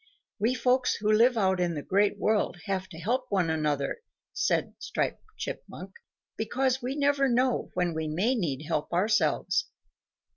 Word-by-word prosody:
"We 230 Hz, +5 st, +2 dB
folks 255 Hz, 0 st, +2 dB
who 210 Hz, +1 st, 0 dB
live 235 Hz, +3 st, +5 dB
out 190 Hz, -3 st, +2 dB
in 175 Hz, -2 st, 0 dB
the 145 Hz, -, -4 dB
Great 205 Hz, +1 st, +2 dB
World 210 Hz, -2 st, +1 dB
have 190 Hz, -1 st, -2 dB
to 160 Hz, -, -10 dB
help 245 Hz, +9 st, -1 dB
one 180 Hz, -5 st, +1 dB
another," 150 Hz, -, -1 dB, 0.3 s
said -, -, 0 dB
Striped -, -, -2 dB, 0.2 s
Chipmunk, -, -, -7 dB, 0.5 s
"because 260 Hz, +3 st, 0 dB
we 255 Hz, +3 st, -3 dB
never 285 Hz, -1 st, +2 dB
know 250 Hz, +1 st, +1 dB
when 180 Hz, -2 st, 0 dB
we 160 Hz, 0 st, -2 dB
may 185 Hz, +11 st, +1 dB
need 155 Hz, -, -2 dB
help 150 Hz, -, -2 dB
ourselves. 185 Hz, -3 st, +1 dB
205 Hz, 155 wpm, -28 LUFS, 170-250 Hz, 0.5 s, live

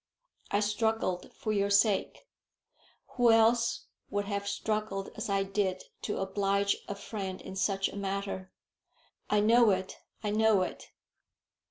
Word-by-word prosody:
I 205 Hz, -, +1 dB
struggled, 210 Hz, -3 st, 0 dB
for 215 Hz, -, -3 dB
your 200 Hz, -1 st, +1 dB
sake. 200 Hz, -, +2 dB, 0.9 s
Who 245 Hz, -1 st, +5 dB
else 230 Hz, +1 st, +3 dB, 0.2 s
would 205 Hz, 0 st, -1 dB
have 200 Hz, 0 st, -3 dB
struggled 210 Hz, -2 st, -2 dB
as 215 Hz, -, -4 dB
I 195 Hz, 0 st, +2 dB
did 195 Hz, -1 st, -1 dB, 0.2 s
to 210 Hz, -, -3 dB
oblige 200 Hz, +1 st, +1 dB
a 200 Hz, -, -4 dB
friend 195 Hz, -2 st, -5 dB
in 190 Hz, -, -9 dB
such 195 Hz, 0 st, +1 dB
a -, -, -9 dB
matter?" 195 Hz, -1 st, -3 dB, 0.8 s
"I 210 Hz, 0 st, +3 dB
know 230 Hz, +2 st, +5 dB
it 190 Hz, -1 st, -1 dB, 0.2 s
I 210 Hz, -, -1 dB
know 215 Hz, -2 st, +4 dB
it." -, -, -7 dB
200 Hz, 140 wpm, -30 LUFS, 195-215 Hz, 0.9 s, Who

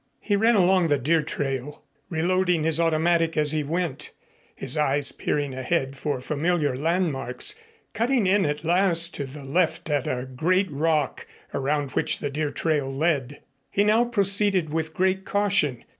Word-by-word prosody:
He 205 Hz, -, -1 dB
ran 225 Hz, +3 st, +3 dB
along 185 Hz, -2 st, +3 dB
the 145 Hz, -2 st, +2 dB
deer 155 Hz, +5 st, +1 dB
trail, 140 Hz, -2 st, -4 dB, 0.3 s
reloading 175 Hz, 0 st, +1 dB
his 160 Hz, 0 st, +1 dB
automatic 165 Hz, 0 st, +1 dB
as 150 Hz, -1 st, +4 dB
he 155 Hz, -1 st, 0 dB
went, 165 Hz, -1 st, -3 dB, 0.5 s
his 135 Hz, +1 st, +1 dB
eyes 145 Hz, -2 st, +2 dB
peering 145 Hz, -2 st, -2 dB
ahead 135 Hz, +1 st, -2 dB
for 140 Hz, -1 st, -3 dB
familiar 150 Hz, +1 st, -1 dB
landmarks, 160 Hz, -, -1 dB, 0.4 s
cutting 235 Hz, +1 st, +1 dB
in 195 Hz, +1 st, +3 dB
at 150 Hz, -1 st, -2 dB
last 170 Hz, 0 st, +3 dB
to 140 Hz, -, -3 dB
the 140 Hz, +2 st, -10 dB
left 160 Hz, +2 st, -1 dB
at 145 Hz, -3 st, 0 dB
a 125 Hz, 0 st, -2 dB
great 180 Hz, +9 st, 0 dB
rock 150 Hz, -1 st, -1 dB, 0.3 s
around 140 Hz, 0 st, -1 dB
which -, -, 0 dB
the 145 Hz, -, -4 dB
deer 150 Hz, +1 st, -2 dB
trail 145 Hz, -3 st, -1 dB
led. 145 Hz, -2 st, -1 dB, 0.3 s
He 200 Hz, -, +1 dB
now 215 Hz, +3 st, +3 dB
proceeded 200 Hz, -7 st, +2 dB
with 160 Hz, -1 st, -3 dB
great 190 Hz, +1 st, +1 dB
caution. 190 Hz, -, 0 dB
160 Hz, 160 wpm, -24 LUFS, 145-185 Hz, 0.5 s, as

